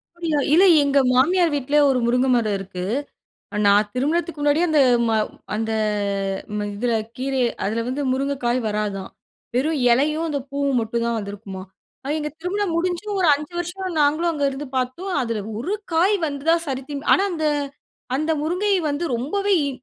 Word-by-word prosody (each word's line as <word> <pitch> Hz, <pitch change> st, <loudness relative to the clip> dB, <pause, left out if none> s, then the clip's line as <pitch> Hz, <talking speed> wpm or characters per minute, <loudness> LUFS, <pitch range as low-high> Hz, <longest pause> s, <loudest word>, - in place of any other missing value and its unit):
அப்பிடீயா. 330 Hz, -4 st, -1 dB
இல்ல, 360 Hz, -, +6 dB, 0.2 s
எங்க 280 Hz, 0 st, +3 dB
மாமியார் 335 Hz, +7 st, +3 dB
வீட்ல 285 Hz, +1 st, -2 dB
ஒரு 255 Hz, -2 st, +2 dB
முருங்க 250 Hz, +2 st, +2 dB
மரம் 215 Hz, -4 st, +1 dB
இருக்கு. 185 Hz, -2 st, -6 dB, 0.8 s
நான் 205 Hz, +1 st, +4 dB
திருமணத்துக்கு 310 Hz, +5 st, -1 dB
முன்னாடியே 295 Hz, +4 st, +3 dB
அந்த 305 Hz, -2 st, +3 dB, 0.3 s
ம -, -, +1 dB, 0.4 s
அந்த 225 Hz, +1 st, -2 dB, 0.9 s
ம 205 Hz, -, -2 dB
இதில 235 Hz, +3 st, 0 dB, 0.2 s
கீரை, 265 Hz, +1 st, -1 dB, 0.2 s
அதில 220 Hz, +3 st, -1 dB
வந்து 270 Hz, +3 st, -2 dB
முருங்கைக்காய் 260 Hz, -2 st, 0 dB
வராதாம். 210 Hz, -2 st, -3 dB, 0.4 s
வெறும் 295 Hz, +4 st, +1 dB
இலையும், 305 Hz, +6 st, +1 dB
அந்த 290 Hz, -, -1 dB
பூவும் 280 Hz, -2 st, 0 dB
மட்டும் 230 Hz, +1 st, -2 dB
தான் 235 Hz, -1 st, 0 dB
வந்திருக்குமாம். 200 Hz, -2 st, -7 dB, 0.4 s
அது 290 Hz, -, -1 dB
எங்க 300 Hz, 0 st, -3 dB
திருமணம் 385 Hz, 0 st, -1 dB
முடிஞ்சும், 365 Hz, +4 st, -2 dB
ஒரு 350 Hz, -, +3 dB
5 300 Hz, +3 st, -7 dB
வருஷம் 350 Hz, 0 st, -4 dB
நாங்களும் 310 Hz, +4 st, +2 dB
அங்க 290 Hz, -3 st, -1 dB
இருந்து 275 Hz, +2 st, -6 dB
பார்த்தோம். 260 Hz, +10 st, -2 dB
அதில 230 Hz, -3 st, -2 dB, 0.2 s
ஒரு 380 Hz, +11 st, -2 dB, 0.2 s
காய் 375 Hz, +6 st, +4 dB
வந்ததா 290 Hz, +3 st, +1 dB
சரித்திம் 275 Hz, +2 st, -5 dB
ஆனா 390 Hz, -, +2 dB
அந்த 315 Hz, -2 st, -1 dB, 0.7 s
அந்த 310 Hz, +3 st, -1 dB
முருங்கை 365 Hz, +6 st, 0 dB, 0.2 s
வந்து 295 Hz, +4 st, -2 dB
ரொம்பவே 395 Hz, +12 st, -1 dB
இ 280 Hz, -, 0 dB
285 Hz, 155 wpm, -22 LUFS, 245-335 Hz, 0.9 s, இல்ல